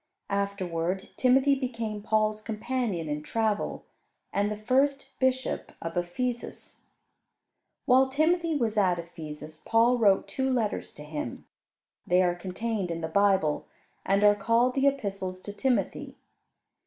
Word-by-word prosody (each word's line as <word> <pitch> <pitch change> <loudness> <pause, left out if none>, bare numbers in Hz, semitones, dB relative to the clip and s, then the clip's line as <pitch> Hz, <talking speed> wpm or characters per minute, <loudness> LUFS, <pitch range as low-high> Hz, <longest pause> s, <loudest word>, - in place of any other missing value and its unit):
Afterward 190 -2 -2
Timothy 265 +2 +4
became 230 -6 -3
Paul's 215 0 +1
companion 215 -5 -2
in 150 0 -2
travel, 215 +5 -1 0.5
and 205 +1 +1
the 210 - -3
first 270 +5 +1
bishop 260 -1 0
of 165 0 -5
Ephesus. 235 +8 -3 1.0
While 265 0 +5
Timothy 325 +3 +2
was 230 -6 0
at 185 -4 +3
Ephesus, 155 -2 -8
Paul 235 +2 +3
wrote 200 -4 +4
two 265 0 -1
letters 225 -5 -1
to 150 - -10
him. 150 -5 -5 0.6
They 180 +1 +4
are 175 -1 +2
contained 190 +2 -3
in 165 0 -3
the 160 - -2
Bible, 190 -4 +2 0.4
and 200 +1 +2
are 205 0 +7
called 230 +5 +2
the 275 +1 +3
Epistles 195 -9 -2
to 205 - -7
Timothy. 255 +3 -1
210 Hz, 130 wpm, -28 LUFS, 180-250 Hz, 1.0 s, are